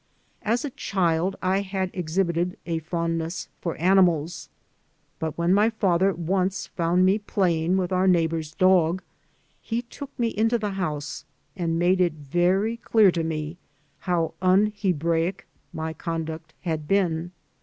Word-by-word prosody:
As 235 +4 0
a 285 - -4
child 180 -3 0
I 190 +2 +2
had 190 -1 -3
exhibited 175 0 -1
a 165 -1 -1
fondness 165 0 -3
for 170 - -3
animals; 175 -3 +2 0.7
but 160 -1 -3
when 170 +2 +2
my 210 +3 +4
father 195 -4 +2
once 185 +2 -1
found 175 +1 +1
me 195 +3 +3
playing 180 -4 +1
with 185 -1 -1
our 185 +1 +2
neighbor's 165 -3 +1
dog 185 -1 +3 0.6
he 230 +2 -2
took 275 +3 -9
me 235 -1 +1
into 225 +2 +1
the 210 -2 -2
house 155 -6 -3 0.3
and 165 -3 -1
made 180 +2 +3
it 175 -3 +2
very 175 +9 +1
clear 220 -4 +4
to 170 -1 -1
me 160 +1 -3 0.4
how 170 -2 0
un 195 +3 +4
Hebraic 170 -2 0 0.3
my 160 0 -4
conduct 160 -1 -5
had 160 -4 -3
been. 175 -3 +1
180 Hz, 145 wpm, -25 LUFS, 165-195 Hz, 0.7 s, my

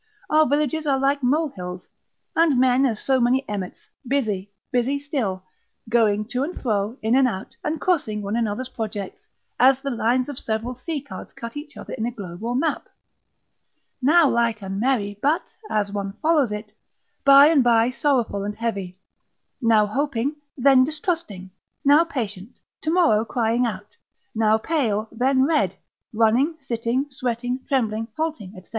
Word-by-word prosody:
Our 310 0 +5
villages 300 +2 0
are 275 -2 +3
like 275 +1 +1
molehills, 245 - -2 0.5
and 325 -6 +3
men 260 +1 +4
as 220 -4 -2
so 265 -1 +1
many 255 +3 +2
emmets, 195 -3 -4 0.3
busy, 210 -8 -1 0.2
busy 255 +2 +1
still, 260 - -3 0.5
going 215 -3 +2
to 250 - -1
and 340 +5 -5
fro, 215 0 -1
in 225 +3 +2
and 265 -1 +5
out, 195 -5 -5
and 315 0 -2
crossing 250 - 0
one 200 +2 -2
another's 235 +2 -2
projects, 210 -5 -6 0.3
as 260 +1 +5
the 275 - -2
lines 245 +2 +1
of 285 -3 -4
several 225 +3 -3
sea 285 +4 -5
cards 285 - -10
cut 230 +2 -8
each 290 -1 -8
other - - -8
in 225 - -2
a - - -2
globe 195 -4 -9
or 240 +1 -1
map. 305 +4 -1 1.1
Now 310 +4 +5
light 235 -4 0
and 195 0 -4
merry, 210 -5 0
but 300 +4 0
(as 205 -2 0
one 200 -1 -4
follows 300 -2 +2
it) 210 0 -6 0.5
by 275 +1 +8
and 300 -5 +4
by 235 0 +4
sorrowful 255 -8 0
and 205 +1 -4
heavy; 200 -5 -4 0.6
now 225 -3 +4
hoping, 270 +4 -1 0.2
then 265 0 +5
distrusting; 300 - -3 0.3
now 295 +4 +6
patient, 220 - -5 0.2
tomorrow 315 -10 +3
crying 235 +1 0
out; 205 -2 -7 0.4
now 220 -1 +3
pale, 220 -5 -1
then 260 +3 +2
red; 305 0 +1 0.4
running, 230 +8 +2
sitting, 245 0 -1
sweating, 245 -1 -2
trembling, 225 -5 0
halting, 310 -12 -3
&c. - - -18
245 Hz, 155 wpm, -23 LUFS, 215-280 Hz, 1.1 s, by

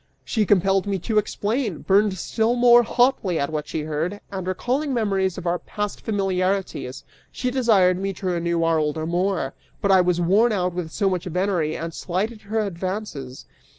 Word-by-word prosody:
She 215 -3 0
compelled 195 0 +3
me 200 -1 0
to 215 +4 +1
explain, 210 - -2
burned 200 0 +3
still 225 +6 0
more 240 0 +7
hotly 240 -6 +1
at 140 +1 -1
what 150 -1 -3
she 160 - -3
heard, 155 +6 -3
and, 190 -2 -5
recalling 260 +9 -1
memories 195 -5 0
of 180 - -7
our 175 0 0
past 210 -1 -5
familiarities, 190 - -1 0.3
she 250 - -2
desired 205 -8 +3
me 195 0 -1
to 190 - -9
renew 170 -2 0
our 165 -1 +2
old 150 0 -1
amour, 175 -2 -1 0.3
but 200 -2 +1
I 190 -1 +6
was 180 -1 +1
worn 200 +7 +3
out 180 -3 0
with 175 -2 -4
so 200 +5 0
much 185 -3 -1
venery 180 -3 0
and 165 0 -5
slighted 210 +7 -3
her 220 +2 -1
advances. 185 -8 -5
190 Hz, 180 wpm, -23 LUFS, 170-210 Hz, 0.3 s, more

